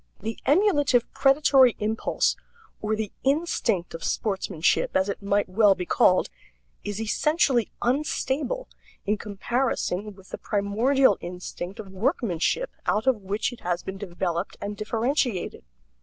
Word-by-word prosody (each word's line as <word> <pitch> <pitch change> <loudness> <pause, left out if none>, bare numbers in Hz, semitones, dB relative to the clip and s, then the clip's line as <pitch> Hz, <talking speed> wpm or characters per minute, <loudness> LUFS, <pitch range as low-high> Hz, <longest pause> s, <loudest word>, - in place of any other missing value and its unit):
The 220 +2 -5
emulative 290 - +3
predatory 270 -3 +5
impulse 215 +1 0 0.5
or 215 0 0
the 215 -2 -3
instinct 265 - 0
of 165 - -7
sportsmanship, 190 -7 0
as 190 +1 +1
it 200 - -4
might 200 +1 +1
well 200 +1 +4
be 180 - -4
called 180 +1 +3 0.5
is 205 0 -4
essentially 250 +2 +1
unstable 295 - -1 0.4
in 210 +1 0
comparison 210 -2 -2
with 190 -1 -17
the - - -6
primordial 215 +4 +2
instinct 180 +3 -7
of 205 -3 -7
workmanship 230 - 0 0.2
out 215 +3 +1
of 255 -5 +2
which 205 +6 -2
it 245 - -12
has 175 0 -2
been 190 0 -6
developed 175 -2 -3
and 205 +1 -4
differentiated. 225 - -1
215 Hz, 130 wpm, -25 LUFS, 195-265 Hz, 0.5 s, predatory